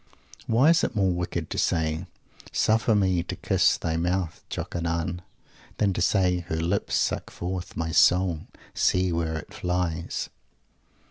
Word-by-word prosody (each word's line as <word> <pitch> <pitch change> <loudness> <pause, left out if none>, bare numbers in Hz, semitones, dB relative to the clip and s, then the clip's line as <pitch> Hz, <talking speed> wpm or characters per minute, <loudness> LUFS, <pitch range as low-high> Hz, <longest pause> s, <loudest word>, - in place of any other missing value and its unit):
Why 130 +8 +5
is 170 - +3
it - - -1
more 95 -3 +2
wicked 85 -2 -3
to - - -2
say, 80 +1 0 0.4
"Suffer 110 0 +2
me 95 -4 +2
to 90 - -5
kiss - - +2
thy 80 0 -2
mouth, 90 0 -1
Jokanaan!" 85 0 -3 0.6
than 100 -2 +2
to - - -2
say, 90 -1 +2
"Her 85 -1 -4
lips 85 +5 -1
suck - - 0
forth 90 0 -5
my 80 0 -2
soul 90 0 +3 0.3
see 90 0 +2
where 80 -1 -1
it 80 - -9
flies!"? 90 -2 -2
90 Hz, 145 wpm, -26 LUFS, 85-95 Hz, 0.6 s, Why